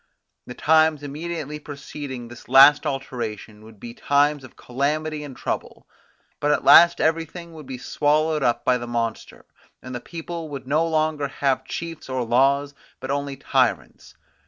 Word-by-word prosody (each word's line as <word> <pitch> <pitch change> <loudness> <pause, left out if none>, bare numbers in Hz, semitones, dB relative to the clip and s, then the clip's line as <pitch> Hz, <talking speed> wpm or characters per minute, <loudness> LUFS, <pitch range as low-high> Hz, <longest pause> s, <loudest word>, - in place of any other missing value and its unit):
The 125 - -8
times 155 -1 +3
immediately 150 0 -5
preceding 140 -4 -8
this 120 0 -13
last 140 +3 +7
alteration 115 -5 -5
would 110 -1 -15
be 115 +2 -9
times 145 +2 +1
of 130 - -14
calamity 150 +4 -2
and 135 -4 -10
trouble: - - -5 0.5
but 145 - 0
at - - +1
last 170 0 +7
everything 165 +1 -2
would 155 -4 -11
be 130 -1 -6
swallowed 150 +4 0
up 120 -3 0
by 125 -1 +2
the 120 - -7
monster; 115 -1 -4 0.3
and 130 - -9
the 120 - -4
people 165 +2 -7
would 140 -2 -7
no 155 +5 +1
longer 155 -2 0
have 135 -1 -1
chiefs 165 0 -7
or 130 -1 -1
laws, 140 +4 +2 0.3
but 130 +1 -5
only 140 -1 -3
tyrants. - - -1
140 Hz, 160 wpm, -23 LUFS, 130-155 Hz, 0.5 s, last